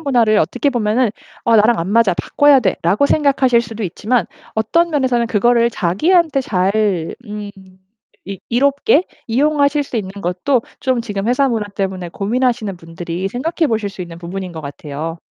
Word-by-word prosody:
문화를 240 -8 +3
어떻게 250 +6 0
보면은 235 -1 +1 0.3
어 230 - +3
'나랑 220 +2 +4
안 165 - -2
맞아. 225 -3 +4
바꿔야 290 +8 +4
돼.'라고 195 +4 +1
생각하실 270 -5 +3
수도 225 -1 -6
있지만 220 +7 -1 0.3
어떤 335 +11 +2
면에서는 255 -5 +1
그거를 235 +2 +3
자기한테 290 - +2
잘 195 -5 0
음 210 -1 -6 0.8
이 195 -1 -6
이롭게 280 - +2 0.2
이용하실 285 +3 +2
수 260 - -6
있는 190 -3 -5
것도 185 +9 0 0.2
좀 255 -3 0
지금 205 -1 -3
회사 265 +3 +3
문화 225 -5 -1
때문에 190 -3 -4
고민하시는 225 +2 -1
분들이 170 +2 -5
생각해 320 - -1
보실 220 -3 -1
수 195 - -11
있는 170 -2 -7
부분인 180 +2 -6
것 160 -1 -8
같아요. 150 +3 -6
225 Hz, 355 characters per minute, -17 LUFS, 190-260 Hz, 0.8 s, 나랑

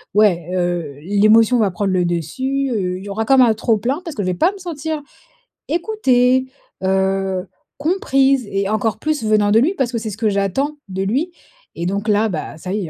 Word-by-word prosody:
ouais, 180 -6 +3
heu, 175 -5 -2
l'émotion 215 +5 +4
va 205 -4 +2
prendre 195 +2 -1
le 180 -1 +2
dessus, 260 - -2
heu, 185 -5 -1
il - - -10
y - - -7
aura 210 +3 -2
quand 270 +3 +4
un 240 -3 +6
trop-plein 230 - 0
parce 330 -5 -7
que 205 - -2
je - - -2
vais 185 - +1
pas 340 - +3
me 400 - -11
sentir, 320 -4 -4 0.7
écoutée, 260 - +2 0.4
heu, 190 0 0 0.3
comprise 275 - +1
et 195 0 -1
encore 215 0 -1
plus, 305 -4 -1
venant 215 -1 +2
de 220 - +5
lui, 305 +11 +2
parce 260 -7 -1
que 240 - -2
c'est 220 -1 -4
ce 210 - -7
que 220 -1 +1
j'attends 200 +10 -1
de 190 0 -2
lui 270 - -1 0.4
et 170 - -4
donc 200 +4 -2
là, 210 +1 +3
bah, 165 -3 -5
ça 180 +3 -5
y 205 -4 -2
est, - - -8
215 Hz, 210 wpm, -19 LUFS, 190-265 Hz, 0.7 s, un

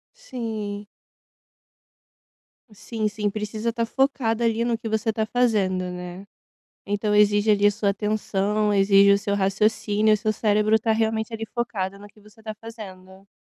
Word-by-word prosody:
Sim. 220 - -6 1.9
Sim, 215 +1 -3
sim. 210 0 -2
Precisa 215 +2 -3
tá 230 0 -1
focada 240 -2 0
ali 230 0 +1
no 235 -1 0
que 225 0 -6
você 220 +1 0
tá 220 0 -1
fazendo, 200 -7 0
né? 180 +2 -8 0.6
Então 205 +1 -1
exige 210 +1 +4
ali 205 -1 +4
a - - +6
sua 205 0 -1
atenção, 210 0 -1
exige 200 0 +5
o 200 - +3
seu 200 0 -2
raciocínio, 210 +2 +2
o - - +2
seu 215 +1 -1
cérebro 215 0 +2
tá 220 +1 0
realmente 220 +1 -1
ali 225 0 -4
focado 200 -5 -3
no 205 - -12
que 210 +1 -20
você 210 +1 -20
tá 215 -1 -6
fazendo. 195 -4 -11
210 Hz, 155 wpm, -24 LUFS, 200-225 Hz, 1.9 s, a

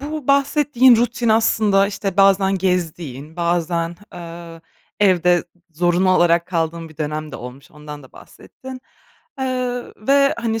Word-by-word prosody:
Bu 300 -1 -6
bahsettiğin 275 -3 +4
rutin 235 0 -1
aslında, 215 -3 +3
işte, 200 -2 -4
bazen 195 -1 +3
gezdiğin 165 -5 -3
bazen, 170 0 -1
aaa, 170 -1 -10 0.4
evde 180 -3 +3 0.3
zorunlu 175 +3 +1
olarak 175 -1 +3
kaldığın 165 -2 -3
bir 155 - -18
dönem 155 -1 -4
de - - -6
olmuş, 125 +3 -11
ondan 150 -1 -11
da 130 - -18
bahsettin. 260 0 -13 0.6
Eee, 265 - -2
ö 250 -1 -3 0.2
ve, 275 0 +4
hani, 225 -1 -2
180 Hz, 135 wpm, -19 LUFS, 165-235 Hz, 0.6 s, bahsettiğin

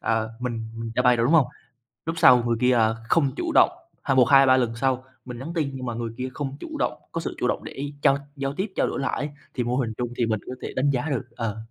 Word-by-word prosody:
ờ, 110 -1 0
mình 115 -3 -3
mình 115 0 -5
giãi 125 - +3
bày 125 -1 +5
rồi, 115 - +1
đúng 155 - +2
hông? 145 -6 +6 0.6
Lúc 165 0 -2
sau 125 -7 +7
người 115 -1 +1
kia, 125 0 +4
ờ, 110 -1 +3
không 145 -5 +3
chủ - - -2
động, - - +6 0.3
ha 135 - +1
một, 125 - +6
hai, 135 +2 +7
ba 130 0 +5
lần 120 -3 0
sau 130 +1 0 0.2
mình 125 -2 -7
nhắn 155 +6 -6
tin 150 -4 0
nhưng 130 -1 -6
mà 120 - -2
người 115 0 -3
kia 130 0 -3
không 140 -2 -4
chủ 315 -2 -6
động, - - +1 0.2
có - - -3
sự - - -5
chủ - - +1
động - - -1
để 140 +1 -6
trao 135 - +4 0.2
giao 135 0 -3
tiếp, 190 +7 -2
trao - - +2
đổi - - -3
lại 135 - -1
ấy, 145 +2 -2 0.2
thì 125 - -1
vô 125 +2 -1
hình 115 -4 -1
chung 120 -1 -2
thì 120 - +2
mình 110 -2 0
có 125 - -4
thể - - -5
đánh 135 +2 +2
giá 135 +3 0
được, 135 -5 -2
ờ. 110 -2 -3
125 Hz, 285 wpm, -25 LUFS, 115-135 Hz, 0.6 s, sau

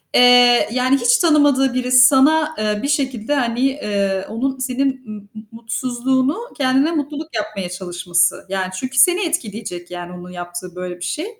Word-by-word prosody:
eee, 245 -1 +6
yani, 255 +2 +2
hiç 245 -1 +3
tanımadığı 290 -5 +3
birisi 255 0 +5
sana, 305 +3 +3
eee, 210 -1 -1
bir - - -1
şekilde, 270 -3 -1
hani, 240 -3 -1
eee, 200 -8 -1
onun 265 +4 -3
senin 260 +1 -2
m 215 - -6 0.2
m 215 - -9
mutsuzluğunu 255 - -2 0.2
kendine 270 +2 +2
mutluluk 305 -1 -5
yapmaya 210 -4 -4
çalışması. 175 -1 -1
Yani, 190 -1 -2
çünkü 260 0 -6
seni 360 +8 +4
etkileyecek 210 - -5
yani 175 0 -7
onun 180 0 -10
yaptığı 175 0 -8
böyle 180 -1 -6
bir 175 - -5
şey. 305 - -3
245 Hz, 160 wpm, -19 LUFS, 195-270 Hz, 0.2 s, eee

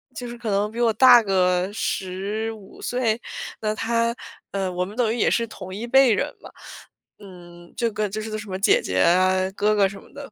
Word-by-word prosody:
就 245 - -6
是 240 0 -8
可 230 -2 -5
能 205 +2 0
比 235 - -7
我 235 -2 +3
大 245 +1 +7
个 180 -2 +1
15 205 +1 -4
岁。 240 -3 -1 0.4
那 215 0 0
他 230 +1 0 0.4
呃， 195 -2 -2
我 180 0 -2
们 205 +3 -10
等 230 -3 +1
于 - - -4
也 - - +2
是 235 - +1
同 190 -3 -9
一 225 +4 -5
辈 265 -1 +5
人 - - -1
嘛。 - - -12 0.7
嗯， 175 -3 -14
这 235 -1 0
个 215 0 -1
就 215 +2 -4
是 220 - -6
个 215 - -4
什 215 - -9
么 185 - -3
姐 195 - +4
姐 95 0 -2
啊、 185 - +3
哥 210 +2 +1
哥 200 -2 +4
什 195 +1 -9
么 - - -19
的。 285 -1 -10
210 Hz, 225 characters per minute, -23 LUFS, 190-230 Hz, 0.7 s, 大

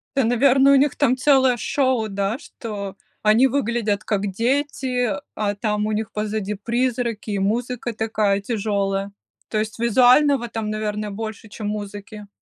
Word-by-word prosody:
Да, 270 - +3
наверное, 270 +3 +5
у - - +7
них 280 +1 +3
там 260 -3 +2
целое 260 -2 +4
шоу, 235 0 0
да, 200 +2 -2
что 205 -8 -7 0.3
они 220 +5 +5
выглядят 235 -6 -1
как 205 -2 -1
дети, 250 +1 0 0.2
а 205 -1 -1
там 210 0 -1
у - - -1
них 220 +1 -2
позади 210 -1 -2
призраки 235 0 -2
и 200 - -1
музыка 240 +4 -1
такая 215 -2 0
тяжелая. 200 -2 -1 0.4
То 215 - -2
есть 215 +1 -3
визуального 250 +3 +4
там, 225 -2 -4
наверное, 215 0 -3
больше, 220 +1 -6
чем 210 0 -6
музыки. 210 0 -7
220 Hz, 150 wpm, -22 LUFS, 210-250 Hz, 0.4 s, у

